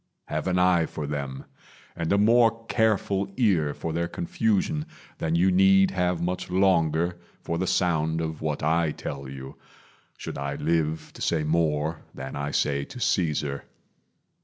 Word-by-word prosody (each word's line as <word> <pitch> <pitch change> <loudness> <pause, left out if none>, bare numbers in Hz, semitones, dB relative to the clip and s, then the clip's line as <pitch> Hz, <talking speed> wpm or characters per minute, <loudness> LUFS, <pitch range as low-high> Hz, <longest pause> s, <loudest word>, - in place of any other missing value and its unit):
Have - - -2
an 90 -1 +1
eye 90 -3 +3
for 75 - -5
them, 70 -2 -4 0.5
And 85 -2 -2
a 100 - +4
more 115 +1 +4
careful 100 -4 +1
ear 90 - +2
for 80 - -4
their 85 +1 -1
confusion 155 - -1 0.3
Than 80 0 0
you 90 +3 +4
need 95 +1 +5
have 90 -2 0
much 90 +1 -2
longer 85 -2 +2 0.2
for 85 0 -2
the 95 - -1
sound 80 -3 +1
Of 80 -1 -4
what 75 -2 -2
I 80 0 +2
tell 70 -1 -6
you 65 0 -9 0.6
should - - -6
I 70 0 -3
live 80 0 -1
to - - -12
say 80 -2 +1
More 80 0 0
than - - -6
I 70 0 -2
say 70 -1 0
to 125 - -10
Caesar. 75 - 0
85 Hz, 160 wpm, -26 LUFS, 75-95 Hz, 0.6 s, need